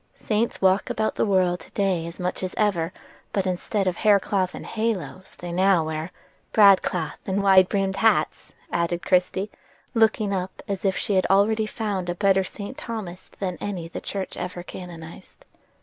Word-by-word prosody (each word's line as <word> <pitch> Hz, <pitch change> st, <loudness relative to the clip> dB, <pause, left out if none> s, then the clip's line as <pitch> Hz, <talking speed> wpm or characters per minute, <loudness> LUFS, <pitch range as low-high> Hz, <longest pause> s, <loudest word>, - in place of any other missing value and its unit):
Saints 220 Hz, +2 st, -1 dB
walk 190 Hz, +1 st, +3 dB
about 220 Hz, 0 st, 0 dB
the -, -, 0 dB
world 185 Hz, -3 st, +2 dB
today 185 Hz, -5 st, -1 dB
as 170 Hz, -, -9 dB
much 180 Hz, 0 st, -2 dB
as 185 Hz, -1 st, -4 dB
ever, 185 Hz, -6 st, +1 dB, 0.4 s
but 195 Hz, -2 st, 0 dB
instead 190 Hz, +2 st, -1 dB
of 185 Hz, -2 st, 0 dB
haircloth 200 Hz, -3 st, +2 dB
and -, -, -8 dB
halos 215 Hz, -4 st, -3 dB
they 175 Hz, 0 st, -6 dB
now 185 Hz, -1 st, +3 dB
wear"— 155 Hz, +1 st, -3 dB, 0.4 s
"Broadcloth 190 Hz, -6 st, +4 dB
and 195 Hz, +1 st, 0 dB
wide 190 Hz, -2 st, +6 dB
brimmed 195 Hz, -1 st, 0 dB
hats," 225 Hz, +2 st, +1 dB, 0.2 s
added 170 Hz, 0 st, -1 dB
Christie, 185 Hz, +2 st, +1 dB, 0.4 s
looking 220 Hz, -2 st, +2 dB
up 185 Hz, 0 st, -4 dB
as 200 Hz, 0 st, -3 dB
if 190 Hz, -1 st, +2 dB
she 205 Hz, -, -1 dB
had 185 Hz, -1 st, +3 dB
already 215 Hz, +3 st, +3 dB
found 200 Hz, -5 st, -3 dB
a 175 Hz, -, -1 dB
better 195 Hz, 0 st, +3 dB
St. 200 Hz, +6 st, -7 dB
Thomas 195 Hz, -6 st, -6 dB
than 185 Hz, -3 st, -3 dB
any 185 Hz, -5 st, -4 dB
the 165 Hz, -, -7 dB
church 195 Hz, -1 st, -4 dB
ever 180 Hz, 0 st, -5 dB
canonized. 170 Hz, -3 st, -10 dB
190 Hz, 165 wpm, -24 LUFS, 180-205 Hz, 0.4 s, wide